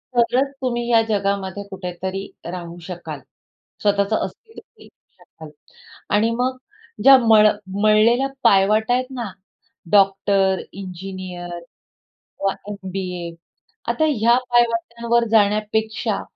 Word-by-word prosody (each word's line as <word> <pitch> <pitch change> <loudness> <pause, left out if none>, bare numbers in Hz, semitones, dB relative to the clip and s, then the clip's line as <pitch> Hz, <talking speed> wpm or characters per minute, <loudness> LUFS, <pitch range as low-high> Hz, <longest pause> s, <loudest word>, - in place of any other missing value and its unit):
तरच 245 +3 +2
तुम्ही 240 -2 -2
या 230 -1 +5
जगामध्ये 200 -1 -1
कुठेतरी 190 0 -5 0.2
राहू 175 -1 -7
शकाल. 170 -5 -7 0.6
स्वतःचं 200 +1 +2
अस्तित्व 450 -1 -12 0.2
बनवू - - -15 0.3
शकाल 160 -1 -13 0.7
आणि 215 +2 +3
मग 255 +1 0 0.5
ज्या 270 +1 +9
मळ 220 -3 +5 0.3
मळलेल्या 220 +5 +4 0.2
पायवाटा 210 +4 +4
आहेत 255 +1 +1
ना, 240 -6 -5 0.6
डॉक्टर, 195 -1 +3
इंजिनिअर 185 -2 -7 0.6
किंवा 195 -1 -3 0.2
एम-बी-ए 185 -3 -5 0.6
आता 315 - +1
ह्या 235 -3 +3
पायवाटांवर 235 0 +1
जाण्यापेक्षा 215 0 +1
205 Hz, 100 wpm, -21 LUFS, 190-235 Hz, 0.7 s, ज्या